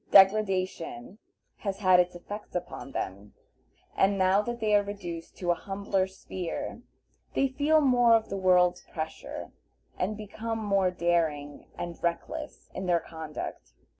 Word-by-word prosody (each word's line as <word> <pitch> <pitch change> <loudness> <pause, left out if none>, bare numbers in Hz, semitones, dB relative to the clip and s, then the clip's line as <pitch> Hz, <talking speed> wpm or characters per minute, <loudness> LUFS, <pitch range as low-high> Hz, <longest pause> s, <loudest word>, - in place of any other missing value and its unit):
Degradation 190 - +3 0.4
has 200 -2 -3
had 185 -3 +5
its 180 0 +2
effect 205 +4 -8
upon 175 -5 -4
them, 100 -1 -5 0.6
and 195 +1 +3
now 190 +1 +4
that 240 +2 -4
they 215 -2 +1
are 205 - +6
reduced 180 -5 -6
to 175 -2 +1
a - - +5
humbler 195 +1 -1
sphere 190 -2 -5 0.5
they 275 - +3
feel 295 +4 +3
more 245 -4 +6
of 225 -1 +1
the 195 - -3
world's 180 -2 +4
pressure, 160 -1 -6 0.5
and 200 +3 -1
become 220 +2 -4
more 200 -3 +2
daring 160 -5 0
and 170 -1 -5
reckless 170 0 -3
in 185 0 -4
their 175 -1 +4
conduct. 160 -2 -7
190 Hz, 140 wpm, -29 LUFS, 175-210 Hz, 0.6 s, are